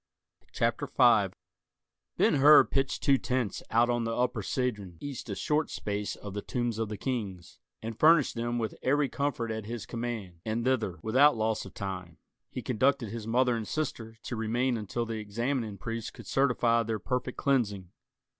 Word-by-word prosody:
CHAPTER - - 0
V - - +4 0.8
Ben - - +4
Hur 150 +2 +8
pitched 135 -1 -1
two 140 -3 +4
tents 125 -5 -1
out 115 +1 +4
on 120 -1 0
the 115 0 -2
Upper 125 -2 0
Cedron 105 - -2
east 140 -4 -6
a 100 - -2
short 150 +7 0
space 105 0 -3
of 100 -2 -8
the 105 - -3
Tombs 120 -2 -2
of 110 -2 -1
the 105 - -5
Kings, 100 -9 -4 0.2
and 115 0 -5
furnished 155 -2 +5
them 120 +1 -2
with 115 -2 -2
every 145 +2 +2
comfort 130 -5 -2
at 110 -1 -5
his 115 -1 -5
command; 115 -7 -5
and 110 +3 -2
thither, 115 -9 0
without 130 +5 +5
loss 110 0 0
of - - -12
time, 90 -5 -5 0.3
he 125 - -6
conducted 130 -1 +1
his 110 0 -6
mother 125 +1 +3
and 110 -2 -4
sister, 115 -7 -4
to 120 - -4
remain 120 +3 0
until 115 +2 -3
the 115 -1 -4
examining 110 +1 -2
priest 115 +3 -5
could - - -11
certify 120 -3 +2
their 115 -1 -2
perfect 125 +4 -3
cleansing. 105 -10 0
115 Hz, 175 wpm, -29 LUFS, 110-130 Hz, 0.8 s, Hur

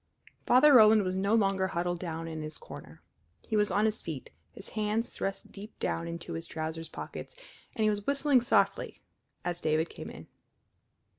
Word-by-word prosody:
Father 280 +4 +7
Roland 215 -3 +8
was 185 0 -2
no 200 +3 +2
longer 195 -3 +2
huddled 175 0 -2
down 165 -2 -4
in 160 -1 -5
his 155 0 -6
corner. - - -12 0.4
He 220 - -1
was 210 -1 +3
on 210 +2 +2
his 220 0 0
feet, 155 -6 -7 0.2
his 200 - -11
hands 215 +2 -1
thrust 195 0 -4
deep 210 +2 -10
down 165 0 -2
into 170 0 -6
his 165 0 -4
trousers 160 +1 -5
pockets, - - -8 0.4
and 220 - 0
he 215 - +4
was 205 -1 -4
whistling 280 -2 +3
softly 240 - +1 0.5
as 175 0 -3
David 155 +1 +1
came - - -8
in. - - -10
195 Hz, 175 wpm, -30 LUFS, 165-215 Hz, 0.5 s, Roland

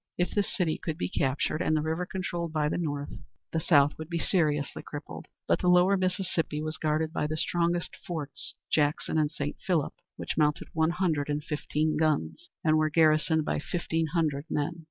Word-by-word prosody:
If 175 - +1
this 205 -1 0
city 170 -5 0
could 160 -2 -3
be 180 - -2
captured, 145 +1 0
and 155 -3 +2
the - - +1
river 160 +3 -1
controlled 175 -3 -3
by 150 -2 +1
the - - -1
North, 145 -4 -3 0.4
the 165 - +2
South 145 -2 +4
would 160 0 -6
be 170 - -1
seriously 150 -5 +1
crippled. - - -8 0.2
But - - +3
the 180 - 0
lower 180 +2 +6
Mississippi 185 -4 -1
was 155 +1 -3
guarded 155 +1 0
by 150 - 0
the 155 +1 -3
strongest 170 +1 0
forts, 145 -6 -4 0.2
Jackson 150 +1 +1
and 150 -1 +2
St. 145 -3 -4
Philip, 170 -6 +1 0.2
which - - -4
mounted 150 -1 +1
one 160 0 +2
hundred 170 -5 0
and 150 0 -1
fifteen 150 +1 -1
guns, 160 - 0
and 155 -1 +4
were 155 0 +2
garrisoned 155 0 +3
by - - 0
fifteen 165 0 -1
hundred 150 -3 0
men. 155 +3 -1
155 Hz, 190 wpm, -29 LUFS, 150-170 Hz, 0.4 s, lower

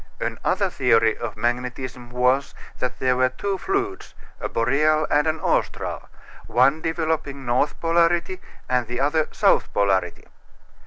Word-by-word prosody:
Another - - -1
theory 115 -1 +3
of - - -6
magnetism 125 +1 -3
was 125 +3 +1 0.2
that 125 0 -2
there 130 -1 +1
were 130 0 +3
two 195 +9 -3
fluids 390 0 -3 0.2
a - - -4
boreal 150 +6 +2
and 150 +2 +3
an 155 0 0
austral - - -2 0.4
one 135 +6 +3
developing 160 -4 -2
north 125 +5 0
polarity 170 +2 +1 0.3
and 125 -2 0
the 120 +1 -4
other 150 +3 +1
south - - +2
polarity. 95 -3 0
135 Hz, 130 wpm, -23 LUFS, 125-160 Hz, 0.4 s, theory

